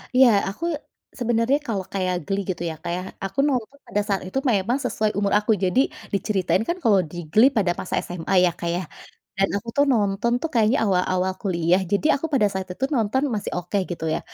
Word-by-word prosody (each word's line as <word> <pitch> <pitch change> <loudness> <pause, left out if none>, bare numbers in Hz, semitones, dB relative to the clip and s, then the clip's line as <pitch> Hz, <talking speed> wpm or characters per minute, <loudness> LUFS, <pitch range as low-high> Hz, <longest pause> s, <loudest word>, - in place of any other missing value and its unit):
Iya 260 0 +8 0.2
aku 265 +13 -5 0.5
sebenarnya 240 +3 +2
kalau 195 -5 -2
kayak 185 -2 0
Glee 195 +3 -1
gitu 175 -2 -2
ya 160 - -5
Kak 175 - -4
ya, 180 - -3 0.2
aku 195 +8 -5
nonton 260 0 -2
pada 205 - 0
saat 195 -2 0
itu 190 - -4
memang 210 +4 +1
sesuai 215 -2 0
umur 200 -1 +1
aku, 210 +1 0
jadi 185 +7 +2 0.3
diceritain 195 0 +1
kan 345 - 0
kalau 205 -4 +5
di 175 - -8
Glee 240 +6 +6
pada 185 -4 +3
masa 185 - -6
SMA 180 +1 -4
ya 175 - +2
Kak 170 - -2
ya 180 +1 -2 0.6
dan 195 - +4
aku 230 +3 -6
tuh 285 - +5
nonton 210 +1 +1
tuh 325 - -2
kayaknya 230 +3 +3
awal-awal 185 -1 +1
kuliah, 180 -1 +2
jadi 205 +9 +2
aku - - -1
pada 245 -6 +3
saat 190 -1 -4
itu 265 - -3
nonton 230 +4 +1
masih 205 - -3
oke 180 +3 -3
gitu 170 -2 -4
ya. - - -2
200 Hz, 205 wpm, -23 LUFS, 185-230 Hz, 0.6 s, Iya